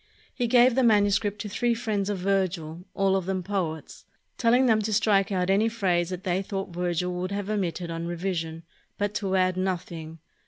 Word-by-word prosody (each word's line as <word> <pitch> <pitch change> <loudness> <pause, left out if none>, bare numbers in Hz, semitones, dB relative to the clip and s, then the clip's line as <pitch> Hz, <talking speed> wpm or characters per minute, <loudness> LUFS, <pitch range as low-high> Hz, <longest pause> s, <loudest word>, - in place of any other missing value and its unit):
He 245 -2 -1
gave 245 +1 +5
the 265 - +2
manuscript 205 -2 +3
to 210 - -5
three 235 +3 0
friends 215 -4 -1
of 205 - -1
Virgil, 180 -3 -1
all 195 -1 +2
of 190 -2 -1
them 190 -1 -1
poets, 170 -6 -4 0.3
telling 245 +2 +3
them 220 -3 +4
to 215 +1 -2
strike 205 -1 +3
out 185 -1 +1
any 210 +4 +3
phrase 180 -6 0
that 185 0 -5
they 185 +1 0
thought 195 -2 -5
Virgil 180 0 -1
would 180 +1 -3
have 200 +1 -3
omitted 180 -4 -2
on 165 0 -4
revision, 170 -2 -3 0.3
but 205 0 -1
to 195 -3 -1
add 185 -1 +2
noth 185 -2 -2
ing. 160 -1 -8
190 Hz, 195 wpm, -26 LUFS, 180-210 Hz, 0.3 s, gave